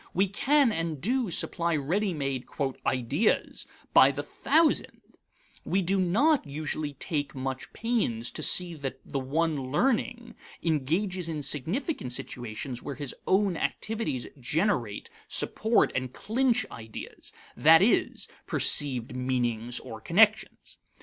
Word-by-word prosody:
We 195 Hz, +3 st, +3 dB
can 275 Hz, +6 st, +2 dB
and 165 Hz, -5 st, -3 dB
do 240 Hz, -, 0 dB
supply 170 Hz, 0 st, -1 dB
ready 180 Hz, +8 st, 0 dB
made 135 Hz, -5 st, -3 dB, 0.4 s
"ideas" 130 Hz, -, 0 dB, 0.3 s
by -, -, +8 dB
the -, -, -4 dB
thousand; 320 Hz, 0 st, +1 dB, 0.6 s
we 190 Hz, +1 st, 0 dB
do 190 Hz, +3 st, +1 dB
not 235 Hz, -, +3 dB
usually 150 Hz, 0 st, -4 dB
take 145 Hz, 0 st, -3 dB
much 135 Hz, +2 st, -5 dB
pains 210 Hz, -, -1 dB
to -, -, -5 dB
see 180 Hz, -1 st, +3 dB
that 135 Hz, -4 st, -6 dB
the 140 Hz, -, -3 dB
one 145 Hz, 0 st, -1 dB
learning 240 Hz, -, 0 dB, 0.3 s
engages 170 Hz, +4 st, -1 dB
in 155 Hz, -3 st, -4 dB
significant 155 Hz, -, -1 dB
situations 120 Hz, +1 st, -4 dB
where 140 Hz, -, -6 dB
his 140 Hz, -2 st, -5 dB
own 195 Hz, -1 st, +2 dB
activities 215 Hz, -, -2 dB
generate, 140 Hz, -, -1 dB, 0.2 s
support, 220 Hz, +1 st, +2 dB
and 130 Hz, 0 st, -3 dB
clinch 245 Hz, -, 0 dB
ideas 110 Hz, -1 st, -8 dB, 0.2 s
that -, -, +6 dB
is, -, -, +1 dB, 0.2 s
perceived 125 Hz, -4 st, +4 dB
meanings 120 Hz, -2 st, -1 dB
or 115 Hz, -3 st, -9 dB
connections. 210 Hz, -, +2 dB
160 Hz, 125 wpm, -28 LUFS, 130-210 Hz, 0.6 s, by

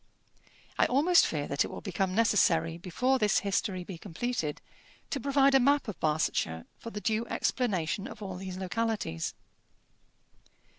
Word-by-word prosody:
I -, -, +5 dB
almost 320 Hz, +7 st, +5 dB
fear 145 Hz, -2 st, -2 dB
that 140 Hz, -, +1 dB
it -, -, -4 dB
will -, -, -7 dB
become 190 Hz, -2 st, -2 dB
necessary, 170 Hz, -7 st, +3 dB
before 250 Hz, +10 st, 0 dB
this 210 Hz, -3 st, +3 dB
history 195 Hz, -2 st, -1 dB
be 175 Hz, -2 st, -8 dB
completed, 185 Hz, -4 st, -3 dB, 0.5 s
to 280 Hz, -, -1 dB
provide 275 Hz, +1 st, +3 dB
a 270 Hz, -, +7 dB
map 280 Hz, +1 st, +3 dB
of 210 Hz, -, -6 dB
Barsetshire 150 Hz, -, 0 dB
for 230 Hz, -, -7 dB
the 210 Hz, -, -5 dB
due 220 Hz, +2 st, -1 dB
explanation 195 Hz, -4 st, -1 dB
of -, -, -10 dB
all 190 Hz, -2 st, -5 dB
these 185 Hz, 0 st, -6 dB
localities. 190 Hz, -, -2 dB
200 Hz, 150 wpm, -30 LUFS, 175-240 Hz, 0.5 s, a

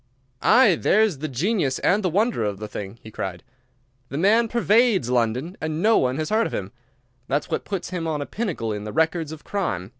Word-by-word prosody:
"Aye, 225 Hz, -9 st, +5 dB
there's 210 Hz, -8 st, +3 dB
the 155 Hz, -, -3 dB
genius 150 Hz, -, 0 dB
and 200 Hz, +4 st, +2 dB
the 185 Hz, -, 0 dB
wonder 210 Hz, -, +1 dB
of 105 Hz, -2 st, -2 dB
the 105 Hz, +1 st, -6 dB
thing!" 105 Hz, +1 st, -7 dB
he 110 Hz, -, -10 dB
cried. 90 Hz, -4 st, -5 dB, 0.7 s
"The 140 Hz, -, -4 dB
man 220 Hz, +7 st, +4 dB
pervades 225 Hz, -, +2 dB
London, 125 Hz, -, 0 dB
and 155 Hz, 0 st, -2 dB
no 220 Hz, +5 st, +4 dB
one 130 Hz, +1 st, 0 dB
has 155 Hz, +3 st, -3 dB
heard 225 Hz, +1 st, +2 dB
of -, -, -9 dB
him. 95 Hz, 0 st, -4 dB, 0.6 s
That's 145 Hz, +2 st, -1 dB
what -, -, -2 dB
puts 190 Hz, -3 st, -4 dB
him 170 Hz, -3 st, -3 dB
on 155 Hz, -2 st, -1 dB
a 145 Hz, -, -3 dB
pinnacle 160 Hz, -, -3 dB
in 105 Hz, 0 st, -5 dB
the 105 Hz, 0 st, -6 dB
records 160 Hz, -1 st, 0 dB
of 160 Hz, -1 st, -9 dB
crime. 100 Hz, -, -3 dB
160 Hz, 210 wpm, -23 LUFS, -, 0.7 s, Aye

